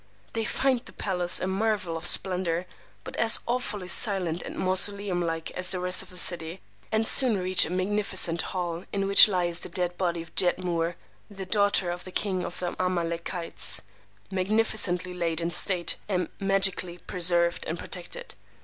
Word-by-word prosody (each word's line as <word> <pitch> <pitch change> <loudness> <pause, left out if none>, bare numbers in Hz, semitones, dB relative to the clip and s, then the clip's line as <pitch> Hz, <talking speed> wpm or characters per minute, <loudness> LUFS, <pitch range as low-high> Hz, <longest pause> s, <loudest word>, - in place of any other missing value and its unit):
[They 225 -1 -3
find 265 +3 -1
the - - -15
palace 180 -3 -1
a - - -4
marvel 195 -2 -2
of 165 +2 -5
splendor, 180 -2 +1 0.4
but - - -10
as 225 -1 +4
awfully 235 -6 -4
silent 185 -5 +2
and - - -9
mausoleum 190 0 +2
like 165 -1 -4
as 180 0 0
the 185 - +3
rest 180 0 +3
of - - -12
the 180 - -13
city; 175 0 0 0.3
and 220 0 0
soon 250 -6 +6
reach 185 0 +4
a - - -9
magnificent 185 -2 0
hall 175 -2 -5
in 195 -1 -2
which 200 +2 +10
lies 180 -3 -1
the - - -4
dead 180 -1 -4
body 170 -3 -2
of 165 - -20
"Jedmur, 175 -2 0 0.3
the 195 -2 -9
Daughter 200 -3 +1
of 175 0 -8
the 185 - -11
King 185 -2 -2
of 175 - -8
the 175 -1 -5
Amalekites," 170 -1 -3 0.5
magnificently 190 -2 +1
laid 170 -2 -3
in 170 0 -3
state, 175 -1 -1
and 180 -4 -2
magically 195 -3 0
preserved 175 -1 +1
and - - -4
protected. - - -8
185 Hz, 165 wpm, -25 LUFS, 175-195 Hz, 0.5 s, which